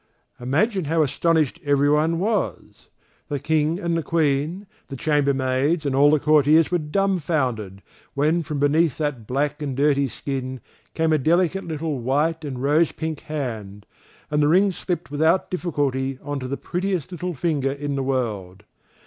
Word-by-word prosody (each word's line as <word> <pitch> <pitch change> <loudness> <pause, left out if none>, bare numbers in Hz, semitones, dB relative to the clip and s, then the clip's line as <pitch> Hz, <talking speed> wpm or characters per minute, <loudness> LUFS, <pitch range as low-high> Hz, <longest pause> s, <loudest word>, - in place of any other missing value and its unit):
Imagine 170 - 0
how 160 +2 +2
astonished 160 +1 +1
everyone 150 +3 +2
was! 190 - -2 0.4
The 145 - -2
King 155 +3 0
and 170 -3 -1
the 165 - 0
Queen, 155 +4 0 0.2
the 135 - -7
chamberlains 140 +1 +1
and 140 - 0
all 145 +2 +6
the 150 0 +4
courtiers 150 +2 +4
were 175 - +2
dumb 190 +5 0
founded, 120 - -2 0.3
when 155 +5 +2
from 150 -2 -4
beneath 145 +1 +2
that 145 -8 -3
black 145 +3 -1
and 140 -3 -3
dirty 140 -1 +3
skin 130 0 -5 0.4
came 160 -1 +2
a 155 - +3
delicate 175 +6 +1
little 155 -3 -3
white 150 +6 0
and 130 -3 -5
rose 150 +3 +3
pink 160 -2 -4
hand, 110 -9 -5 0.5
and 150 0 +2
the 145 - +4
ring 190 +5 +4
slipped 175 -3 -4
without 160 +5 +2
difficulty 140 -7 -1
on 145 -1 -3
to 130 - -5
the 140 +2 -3
prettiest 185 -2 -3
little 180 0 -4
finger 145 -3 0
in 145 +1 -4
the 135 - -1
world. 110 -9 -3
150 Hz, 160 wpm, -23 LUFS, 135-165 Hz, 0.5 s, all